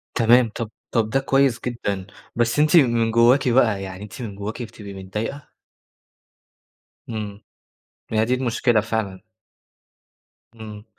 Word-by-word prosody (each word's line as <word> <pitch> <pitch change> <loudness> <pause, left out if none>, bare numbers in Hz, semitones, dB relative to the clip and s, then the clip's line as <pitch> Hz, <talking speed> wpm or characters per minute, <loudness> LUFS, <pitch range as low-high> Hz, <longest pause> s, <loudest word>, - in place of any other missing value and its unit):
تمام، 120 0 +5
طَب 115 -2 -4 0.2
طَب 110 -2 +1
ده 135 - +1
كويس 135 -3 +2
جدًا، 100 -6 -3 0.3
بس 120 +4 +1
أنتِ 150 +2 +4
من 115 -6 +3
جوّاكِ 120 +3 +4
بقى، 115 -5 +3
يعني 95 +1 -8
أنتِ 105 +3 -9
من 105 -4 -6
جوّاكِ 105 +4 -6
بتبقي 105 -3 -10
متضايقة؟ 105 +9 -6 1.6
إمم. 105 -2 -5 0.7
هي 110 0 +2
دي 125 +2 +1
المشكلة 120 -2 +1
فعلًا. 110 -3 -4 1.3
إمم. 105 -1 -10
115 Hz, 125 wpm, -22 LUFS, 105-120 Hz, 1.6 s, تمام